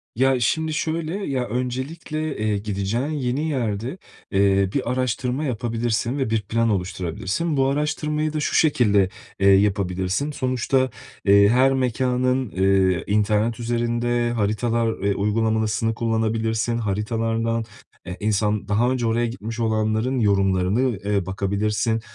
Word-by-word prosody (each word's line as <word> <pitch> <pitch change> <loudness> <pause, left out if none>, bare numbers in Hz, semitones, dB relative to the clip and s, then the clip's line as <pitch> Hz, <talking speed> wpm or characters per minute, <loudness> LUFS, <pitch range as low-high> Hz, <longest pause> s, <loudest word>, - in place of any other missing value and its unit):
Ya, 130 +2 +3
şimdi 160 +6 0
şöyle. 160 +1 -2
Ya, 130 -2 -1
öncelikle, 135 +6 -3
eee, 105 -1 0
gideceğin 105 +5 -2
yeni 145 +1 -1
yerde, 120 - -2 0.3
eee, 100 -1 +3
bir 130 -3 -1
araştırma 125 +2 -1
yapabilirsin 120 0 -1
ve 135 -4 -1
bir 110 -1 +1
plan 115 +3 0
oluşturabilirsin. 95 - -2
Bu 135 0 +3
araştırmayı 150 +2 -1
da 155 - -1
şu 150 - -1
şekilde, 105 -11 +3 0.3
eee, 100 - +3
yapabilirsin. 95 +5 +1
Sonuçta, 130 -1 0 0.4
eee, 100 0 +6
her 130 +3 +4
mekânın, 130 -1 0
eee, 95 -1 +2
internet 105 +3 +1
üzerinde 120 0 0
haritalar, 115 +1 0
eee, 100 0 +1
uygulamasını 110 +1 0
kullanabilirsin. 115 0 0
Haritalardan, 115 +2 -1 0.4
eee, 90 +1 -6
insan 105 0 0
daha 115 +5 +2
önce 125 -2 -1
oraya 115 +1 +1
gitmiş 115 0 -5
olanların 110 +3 0
yorumlarına, 95 -1 +2 0.3
eee, 100 -3 0
bakabilirsin. 105 +4 -1
115 Hz, 125 wpm, -23 LUFS, 105-130 Hz, 0.4 s, eee